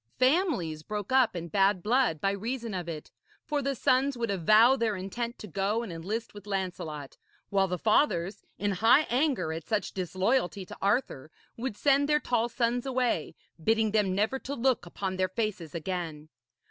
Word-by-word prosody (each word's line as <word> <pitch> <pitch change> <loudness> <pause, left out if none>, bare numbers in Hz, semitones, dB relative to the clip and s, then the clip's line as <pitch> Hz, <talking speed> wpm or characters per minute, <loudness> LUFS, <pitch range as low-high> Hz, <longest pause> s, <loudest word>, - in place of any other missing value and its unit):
Families 255 - +1
broke 210 +5 -5
up 255 -6 +4
in 170 -1 -4
bad 195 0 +2
blood 235 - +2
by 195 - +1
reason 230 +3 -4
of 175 -2 -4
it, 155 -2 -7 0.3
for 295 -2 -1
the 275 0 -1
sons 265 +1 +2
would 230 -3 -1
avow 215 +7 +5
their 230 -4 0
intent 230 +6 -4
to - - -8
go 200 +4 -1
and 200 -7 -6
enlist 205 +8 -4
with 205 0 -12
Lancelot, 175 -7 -4 0.3
while 195 -1 +3
the 180 0 -2
fathers, 205 - +1
in 205 0 0
high 225 +10 +5
anger 255 - +1
at 160 -1 -7
such 215 -2 -1
disloyalty 190 +2 0
to - - -10
Arthur, 200 - 0 0.3
would 230 -3 -4
send 285 0 +3
their 300 0 +4
tall 240 -4 0
sons 240 +2 0
away, 250 - 0 0.3
bidding 220 +1 +2
them 200 -3 +2
never 220 +7 +1
to 280 +2 -5
look 250 -6 +1
upon 185 +1 -4
their 185 0 +1
faces 190 -7 -3
again. 165 -3 -4
210 Hz, 175 wpm, -29 LUFS, 185-245 Hz, 0.3 s, avow